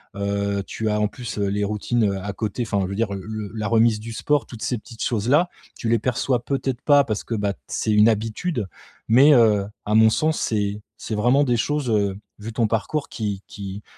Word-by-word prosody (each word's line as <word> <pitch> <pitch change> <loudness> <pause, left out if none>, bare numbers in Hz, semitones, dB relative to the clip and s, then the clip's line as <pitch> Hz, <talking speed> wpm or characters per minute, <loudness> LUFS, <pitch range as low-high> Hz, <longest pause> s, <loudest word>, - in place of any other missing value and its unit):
heu, 100 0 -1
tu 110 -1 -2
as 105 - +1
en 105 - +3
plus, 120 -1 -7
heu, 100 - +1
les 100 +1 -1
routines, 105 +3 0
heu, 100 -1 0
à 105 - -3
côté, 110 +3 -3
enfin 100 -3 -1
je - - -2
veux 100 - -4
dire 110 -1 -1
le 105 +1 -6
la 105 -2 -2
remise 115 0 +3
du 115 +2 -7
sport, 145 +5 +1
toutes 115 -3 -10
ces 125 - -1
petites 115 +1 -8
choses-là, 125 - +2 0.3
tu 115 - -3
les 115 0 +3
perçois 125 +1 0
peut-être 135 -2 -2
pas 145 -1 +5
parce 110 -2 -2
que 115 - -3
bah, 100 -2 -1
c'est 110 - -1
une 105 +1 +6
habitude 115 - -1 0.4
mais 135 +6 +7
heu, 110 -6 +4 0.2
à 105 - -1
mon 110 0 +7
sens, 155 +7 +1
c'est 105 -1 -1 0.2
c'est 110 - -4
vraiment 125 +7 +3
des 120 -2 +2
choses, 145 +2 -1
heu, 100 -2 +1 0.2
vu 110 +2 -7
ton 115 0 +1
parcours 135 +7 -2
qui 100 -4 -4
qui 100 0 -7
110 Hz, 220 wpm, -23 LUFS, 105-120 Hz, 0.4 s, mais